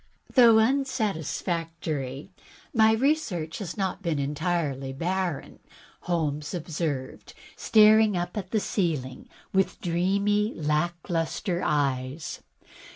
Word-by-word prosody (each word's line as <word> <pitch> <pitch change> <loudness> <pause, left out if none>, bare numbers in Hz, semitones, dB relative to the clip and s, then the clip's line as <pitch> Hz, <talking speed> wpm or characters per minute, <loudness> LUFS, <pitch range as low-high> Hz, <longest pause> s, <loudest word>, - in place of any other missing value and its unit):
"Though 235 -4 +7
unsatisfactory, 170 - -1 0.4
my 220 -2 +5
research 220 - 0
has 190 -3 -6
not 195 -1 -2
been 170 -5 -1
entirely 140 -2 -2
barren," 175 +1 -3 0.4
Holmes 150 -2 -2
observed, 155 -5 -4 0.2
staring 215 -2 +5
up 175 0 -3
at 195 -4 -4
the 220 - +1
ceiling 155 - -2 0.2
with 190 0 +1
dreamy, 200 +5 +1
lack 155 +3 -1
lustre 175 +2 -1
eyes. 140 0 -1
175 Hz, 95 wpm, -26 LUFS, 150-205 Hz, 0.4 s, Though